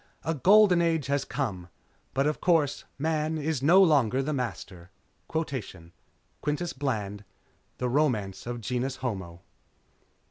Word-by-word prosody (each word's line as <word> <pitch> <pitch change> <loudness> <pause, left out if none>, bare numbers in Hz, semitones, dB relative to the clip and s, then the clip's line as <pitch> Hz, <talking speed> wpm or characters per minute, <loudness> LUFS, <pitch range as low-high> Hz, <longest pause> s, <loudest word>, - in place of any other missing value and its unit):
A 160 - 0
Golden 185 +4 +5
Age 165 -4 +1
has 140 0 0
come. 110 -11 -3 0.5
But, 135 +1 +2
of 150 0 -1
course, 160 -6 +2
Man 155 +1 -1
is 155 -2 -2
no 175 +7 +6
longer 135 - +3
the 150 +3 -2
Master._ 95 -9 -5 1.5
_Quintus 150 +4 -2
Bland, 105 -7 -2 0.5
The 125 - -1
Romance 120 -8 0
of 120 -1 -4
Genus 125 +4 -2
Homo. 95 -10 -5
140 Hz, 120 wpm, -27 LUFS, 120-155 Hz, 1.5 s, no